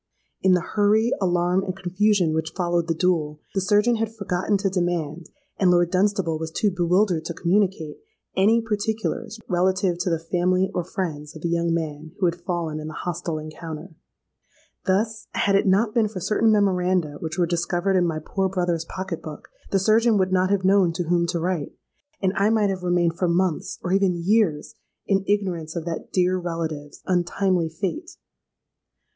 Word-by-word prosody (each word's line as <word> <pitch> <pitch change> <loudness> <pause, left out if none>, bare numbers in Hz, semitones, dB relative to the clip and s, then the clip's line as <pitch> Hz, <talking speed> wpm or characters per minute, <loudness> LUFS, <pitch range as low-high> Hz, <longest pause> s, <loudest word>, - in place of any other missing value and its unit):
In 190 - +4
the 180 - +3
hurry, 215 +5 +2
alarm, 180 0 +2
and 190 -1 -4
confusion 185 -2 +1
which 160 0 -2
followed 175 -2 0
the 165 - 0
duel, 155 -4 0
the 195 - 0
surgeon 210 +4 +3
had 225 0 -1
forgotten 200 -2 -1
to 195 +1 -1
demand, 175 -3 -2 0.3
and 185 - +3
Lord 175 -1 +3
Dunstable 185 -4 +1
was 160 0 -4
too 200 +5 0
bewildered 180 -1 +2
to 170 - -4
communicate, 180 -4 0 0.4
any 215 +5 +4
particulars 220 +1 -2
relative 185 0 +1
to 180 - 0
the 165 - +1
family 180 +3 0
or 180 - -1
friends 160 -5 -5
of 155 - -10
the 170 - 0
young 170 0 +1
man 160 -1 -3
who 190 - +1
had 170 0 -1
fallen 170 -3 -3
in 155 - -6
the 155 - -7
hostile 170 -2 -3
encounter. 155 +2 -8 0.9
Thus, 220 +4 0
had 200 - +2
it 195 - +3
not 210 +3 +3
been 225 -2 +3
for 205 -3 -6
certain 215 +4 +2
memoranda 180 -6 +1
which 160 +1 -5
were 175 - +3
discovered 175 +3 0
in 180 -1 +3
my 160 -2 -2
poor 190 +5 -1
brother's 175 -3 -1
pocket 190 -2 -5
book, 155 -2 -9 0.2
the 195 - +2
surgeon 220 +3 +3
would 185 -1 +1
not 185 0 +2
have 195 -2 +1
known 190 -3 +4
to 175 +1 -2
whom 170 -1 +2
to 170 0 -1
write, 170 -3 -2 0.5
and 190 0 +2
I 200 +2 +3
might 215 -3 +2
have 185 -1 -4
remained 175 -1 +1
for 180 - +2
months—or 175 +1 -1
even 195 -2 +3
years—in 195 +1 -1
ignorance 180 -6 -1
of 165 -2 -4
that 170 -1 -5
dear 185 0 +2
relative's 160 -4 -5
untimely 180 -1 +1
fate. 205 - -5
180 Hz, 175 wpm, -24 LUFS, 170-195 Hz, 0.9 s, In